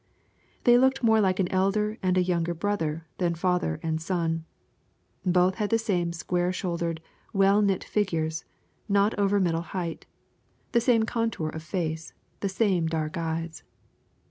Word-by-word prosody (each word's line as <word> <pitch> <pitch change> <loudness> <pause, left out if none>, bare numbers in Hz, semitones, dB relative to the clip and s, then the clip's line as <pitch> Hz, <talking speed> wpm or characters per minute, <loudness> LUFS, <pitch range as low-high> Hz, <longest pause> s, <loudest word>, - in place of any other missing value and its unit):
They 240 0 +6
looked 265 0 +2
more 220 -1 +5
like 185 -1 +1
an 185 - +2
elder 210 +3 +1
and 185 -1 +1
a 180 - +4
younger 170 -1 0
brother 165 -4 -2
than 175 -2 +1
father 175 - 0
and 160 -1 -1
son. 165 -2 -1 0.8
Both 180 0 +3
had 205 - 0
the 225 - +3
same 180 -6 0
square 175 +2 -1
shouldered, 170 -3 -2 0.3
well 195 +1 +4
knit 195 -3 +1
figures, 165 -5 -1 0.5
not 200 +2 +3
over 200 0 +3
middle 165 -3 +1 0.2
height 170 -2 -4 0.6
the 235 - +3
same 230 -2 +3
contour 225 -8 -1
of 160 - -6
face, 160 -2 -3 0.3
the 200 - -1
same 190 -4 +1
dark 155 -1 -2
eyes. 165 -1 -3
180 Hz, 150 wpm, -27 LUFS, 165-205 Hz, 0.8 s, They